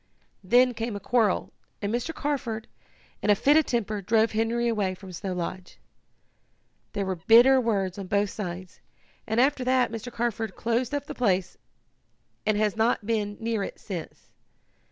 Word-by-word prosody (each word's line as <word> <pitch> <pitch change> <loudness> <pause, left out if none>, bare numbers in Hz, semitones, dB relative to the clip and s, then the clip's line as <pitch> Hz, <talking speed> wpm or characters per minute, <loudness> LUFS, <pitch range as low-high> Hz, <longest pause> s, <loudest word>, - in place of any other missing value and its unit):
Then 245 +6 +4
came 230 -1 -4
a - - -4
quarrel, 215 -1 +1 0.3
and 205 +1 -2
Mr. 245 +7 -1
Carford, 270 -8 -3 0.5
in - - -1
a 205 - +7
fit 275 +8 +4
of 315 - +4
temper, 215 -3 -1
drove 220 +3 +2
Henry 230 +2 0
away 205 -5 0
from 190 0 -11
Snow 185 +2 -4
Lodge. 180 +1 -5 1.2
There 200 -2 -1
were 190 -1 -2
bitter 240 +9 +6
words 200 -5 -1
on 195 - -6
both 200 0 +1
sides, 180 -3 -6 0.5
and 220 +1 0
after 265 0 +3
that 255 -2 +2
Mr. 230 +2 -6
Carford 230 -2 -2
closed 235 +4 -1
up 285 - -3
the - - -6
place, 190 -7 0 0.9
and 215 -1 +3
has 210 -1 +1
not 225 -1 +1
been 210 -2 -1
near 225 -2 -1
it - - -5
since. 175 -6 -8
220 Hz, 165 wpm, -26 LUFS, 200-240 Hz, 1.2 s, a